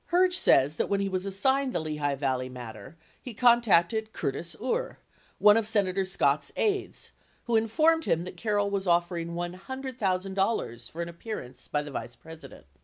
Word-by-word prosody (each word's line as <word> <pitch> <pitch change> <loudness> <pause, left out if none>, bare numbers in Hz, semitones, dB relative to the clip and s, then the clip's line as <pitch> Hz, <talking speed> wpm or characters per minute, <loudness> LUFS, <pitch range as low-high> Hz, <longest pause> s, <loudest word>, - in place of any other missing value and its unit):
Herge 365 +1 +4
says 150 - +3
that - - -1
when 200 - +1
he 200 - 0
was 185 +1 -2
assigned 265 +7 +1
the - - 0
Lehigh 150 -3 -2
Valley 130 -2 -1
matter, 125 +2 -10 0.2
he 245 -4 -8
contacted 220 -3 +3
Curtis 165 +4 -3
Uhre, 475 - -2 0.4
one 210 +1 +6
of 225 -2 0
Senator 195 -3 +1
Scott's 190 +1 +1
aides, 405 -2 -1 0.3
who 235 - 0
informed 310 +9 +3
him 165 +1 +1
that 180 - -8
Carroll 205 -2 0
was 195 -1 -2
offering 170 -1 0
$100,000 190 - -2
for 170 +1 -4
an 170 - -6
appearance 170 - -8
by 150 0 -1
the 145 - -8
Vice 120 -2 -6
President. 160 - -13
190 Hz, 165 wpm, -28 LUFS, 160-225 Hz, 0.4 s, one